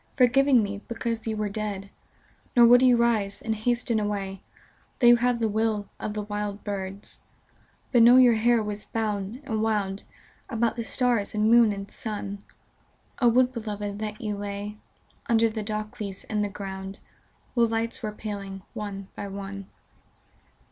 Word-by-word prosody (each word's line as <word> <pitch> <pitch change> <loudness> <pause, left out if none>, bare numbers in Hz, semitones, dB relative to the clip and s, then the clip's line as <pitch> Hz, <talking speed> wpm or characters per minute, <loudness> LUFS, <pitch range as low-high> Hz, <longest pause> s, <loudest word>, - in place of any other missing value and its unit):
Forgiving 255 -1 +5
me, 200 0 -4
because 230 -1 -3
you 220 -1 -1
were 210 0 -1
dead: 200 -1 -4 0.6
Nor 240 -1 +8
would 245 +1 +7
you 250 -2 +6
rise 220 -4 +1
and 225 - -2
hasten 235 +1 0
away, 200 -2 -3 0.6
Though 245 - +1
you 240 0 +8
have 245 0 +1
the 225 -1 +1
will 215 -1 -1
of 210 - -4
the 210 - -2
wild 205 0 -4
birds, 195 -1 -5 0.7
But 240 - +5
know 240 +2 +8
your 250 -2 +7
hair 230 0 +3
was 210 0 -4
bound 215 +1 -3
and 220 -5 -2
wound 205 -3 -1 0.4
About 235 -2 0
the 235 - -3
stars 235 -4 +1
and 215 +1 +3
moon 235 -2 +6
and 200 0 -6
sun: 205 -2 -5 0.8
O 245 - +4
Would 250 +2 +4
beloved 210 -3 -4
that 215 0 -4
you 210 -2 -3
lay 205 +1 -5 0.5
Under 230 -1 +4
the 220 0 -4
dock 215 0 -3
leaves 200 -3 -5
in 210 -1 -2
the 205 - -1
ground, 195 -1 -7 0.6
While 235 -2 +3
lights 225 +1 -1
were 215 - -3
paling 200 -3 -6
one 195 -2 -6
by 200 - -5
on§. 195 0 -7
215 Hz, 165 wpm, -26 LUFS, 200-235 Hz, 0.8 s, Nor